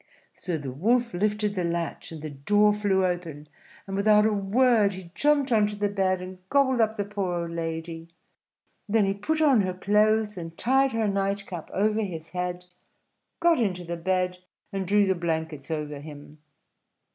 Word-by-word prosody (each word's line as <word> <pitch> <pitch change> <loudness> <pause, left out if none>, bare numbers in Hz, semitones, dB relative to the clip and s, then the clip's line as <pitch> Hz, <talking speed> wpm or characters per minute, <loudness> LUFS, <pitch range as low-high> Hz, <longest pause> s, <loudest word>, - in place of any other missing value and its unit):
So 175 -3 -3
the 140 -4 -6
Wolf 235 - +1
lifted 210 +2 0
the 185 -3 -2
latch, 170 0 -3
and 155 -2 -8
the 155 - -5
door 205 +9 +3
flew 200 -2 +1
open; 170 -5 -4 0.4
and 195 - -5
without 210 +1 +4
a 220 - +2
word 210 +1 +3
he 185 -2 -10
jumped 290 0 +2
on 215 -2 +4
to 210 - -4
the 205 0 0
bed 190 -2 0
and 185 0 -9
gobbled 260 -3 +3
up 220 0 +1
the 205 - -2
poor 190 -4 -2
old 170 - -6
lady. 165 0 -5 0.8
Then 215 -1 +3
he 195 - +1
put 310 +11 -1
on 270 -7 +5
her 185 -2 -2
clothes, 210 +2 +2
and 165 -1 -7
tied 265 +3 +3
her 225 -1 +1
night 200 0 -1
cap 175 -5 -7
over 215 +2 +1
his 165 -6 -5
head; 180 0 -3 0.7
got 335 -3 +4
into 185 -6 -1
the 170 0 -4
bed, 180 +1 -1 0.3
and 195 -2 -3
drew 205 +1 +4
the 190 - +2
blankets 160 -4 -3
over 150 -2 -4
him. 150 0 -11
195 Hz, 180 wpm, -26 LUFS, 170-210 Hz, 0.8 s, on